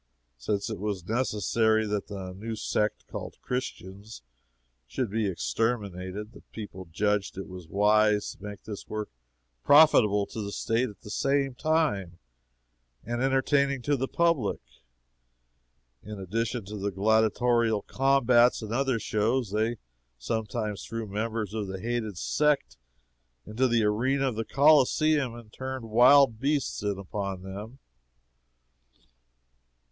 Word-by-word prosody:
Since 100 - -2
it 110 - -5
was 100 -4 -4
necessary 110 -1 +1
that 105 -1 -2
the 95 -3 -6
new 110 +4 -5
sect 105 -1 -1
called - - -8
Christians 105 - -6 0.6
should 110 - -3
be 110 -1 0
exterminated, 100 0 -2
the - - -14
people 100 -4 -8
judged 105 +2 0
it 95 - -5
wise 105 +4 +2
to - - -16
make 105 -1 -8
this 105 -2 -8
work 105 -1 -4 0.5
profitable 110 -9 +6
to 110 - -6
the 100 -1 -5
State 115 +4 0
at 105 - -15
the 105 - -10
same 135 +2 +1
time, 125 - 0 0.9
and 120 +1 -3
entertaining 135 0 +2
to 145 +2 +2
the 135 0 -2
public. 165 -12 +1 1.4
In 105 0 -8
addition 115 +4 -2
to 105 +2 -7
the 100 0 -2
gladiatorial 110 +2 +2
combats 125 -3 +3
and 110 +1 -5
other 135 -1 +1
shows, 110 +2 0
they 110 +3 0 0.4
sometimes 105 - -3
threw 115 0 -5
members 110 +1 -3
of 105 -3 -3
the 95 0 -5
hated 110 -3 -3
sect 150 - +1 0.7
into 120 +5 +1
the 120 -2 +2
arena 130 +6 +1
of 120 - -5
the 115 +1 -3
Coliseum 145 -1 +3
and 115 -2 -13
turned 130 -4 -6
wild 125 0 +6
beasts 140 +2 -1
in 100 -1 -1
upon 100 -1 -5
them. 105 +6 -8
110 Hz, 130 wpm, -27 LUFS, 100-125 Hz, 1.4 s, profitable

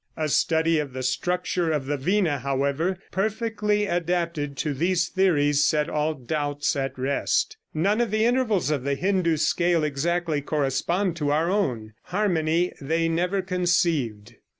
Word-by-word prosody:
A 155 -1 -1
study 160 +2 +2
of 145 -4 -4
the 130 0 -4
structure 175 +5 -1
of 150 -4 -1
the 145 +2 -1
vina, 165 0 +1
however, 140 +7 -1
perfectly 210 0 0
adapted 170 -5 -1
to 150 - -1
these 170 +4 +1
theories, 145 -6 +2
set 150 0 +1
all 155 +1 0
doubts 145 +2 -2
at 135 -1 -3
rest. 135 +2 0 0.2
None 200 +8 +2
of 235 - 0
the 215 +2 +1
intervals 235 - +1
of 140 -4 -1
the 140 +1 0
Hindoo 180 0 +1
scale 170 +1 +2
exactly 155 +2 -1
correspond 155 +6 0
to 145 -3 -1
our 160 +4 +1
own. 120 - -1
Harmony 175 -3 0
they 165 +4 0
never 180 +4 0
conceived. 165 - 0
165 Hz, 150 wpm, -25 LUFS, 145-180 Hz, 0.2 s, study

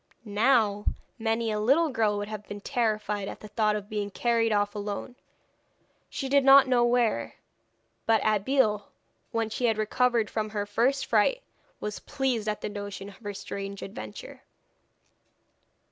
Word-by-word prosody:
Now, 210 -1 +2 0.3
many 225 0 0
a 210 - -1
little 280 +10 +3
girl 215 -5 +1
would 205 0 -3
have 210 -1 -7
been 205 - -6
terrified 215 -4 -1
at - - -7
the 215 - -8
thought 215 -1 +1
of 205 -1 -5
being 210 -2 -3
carried 230 +2 +1
off 205 -1 +1
alone, 205 +3 -5 0.9
she 270 - -4
did 280 +1 +4
not 275 0 +8
know 250 -2 +3
where. 240 - +1 0.7
But 225 -1 +4
Abeille, 215 0 +2 0.4
when 225 -1 -1
she 245 - -1
had 225 -2 +2
recovered 230 +1 +2
from 215 0 -2
her 205 -1 -2
first 235 +7 +1
fright, - - +2 0.4
was 210 0 -4
pleased 260 -6 -1
at 210 - -3
the - - -2
notion 200 -1 -6
of 195 - -14
her 205 -2 -6
strange 200 0 -6
adventure. 110 - -8
215 Hz, 155 wpm, -27 LUFS, 205-240 Hz, 0.9 s, not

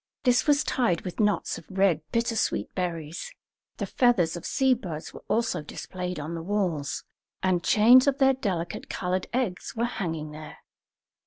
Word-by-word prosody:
This 250 +2 +3
was 290 0 +4
tied 230 -10 +1
with 180 - -7
knots 210 -1 +1
of - - -17
red 190 -5 +2
bittersweet 230 -1 0
berries; 170 - -4 0.5
the - - -2
feathers 220 -10 +2
of 170 - -6
sea 265 -1 +3
birds 175 -10 -6
were - - -11
also 225 -7 0
displayed 180 +3 -5
on 155 +3 -5
the 165 - -4
walls, 170 -7 -1 0.4
and 185 -2 +2
chains 245 +5 +6
of 280 -1 +3
their 270 -1 +5
delicate 185 -9 -3
coloured 180 0 -2
eggs 240 -7 -2
were 230 +1 +1
hanging 165 -10 -3
there. 155 0 -9
185 Hz, 160 wpm, -27 LUFS, 170-240 Hz, 0.5 s, chains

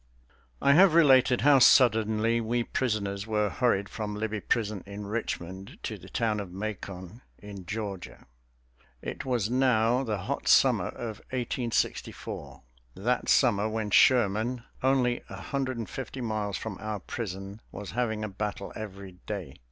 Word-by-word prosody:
I 140 - +6
have 180 +1 +6
related 130 -6 +5
how 140 0 +6
suddenly 115 -2 +4
we 120 +2 0
prisoners 105 -5 -2
were 105 -2 +1
hurried 110 -6 +1
from 105 -1 -5
Libby 110 0 -3
Prison 110 -4 -1
in 100 +1 -7
Richmond 95 -3 -5
to - - -3
the - - -13
town 110 -2 0
of 100 -3 -6
Macon 100 +1 -6 0.2
in 100 -3 -10
Georgia. 100 -2 -6 0.8
It - - -5
was 120 -4 0
now 125 -1 +3
the 110 -5 -2
hot 90 - -4
summer - - +5
of 110 -3 -6
1864, 120 -1 -3 0.3
that 120 +6 -1
summer 110 -5 +4
when 110 -1 -3
Sherman, 120 0 +4 0.2
only 125 -2 +2
a - - -7
hundred 130 -3 -3
and 115 - -4
fifty 135 0 -6
miles 110 -4 -2
from 110 -4 -6
our 105 0 -3
prison, 100 0 -6
was 105 -1 -7
having 110 -2 -1
a - - -1
battle 100 0 -5
every 100 -3 -8
day. 95 -10 -5
110 Hz, 145 wpm, -28 LUFS, 100-120 Hz, 0.8 s, I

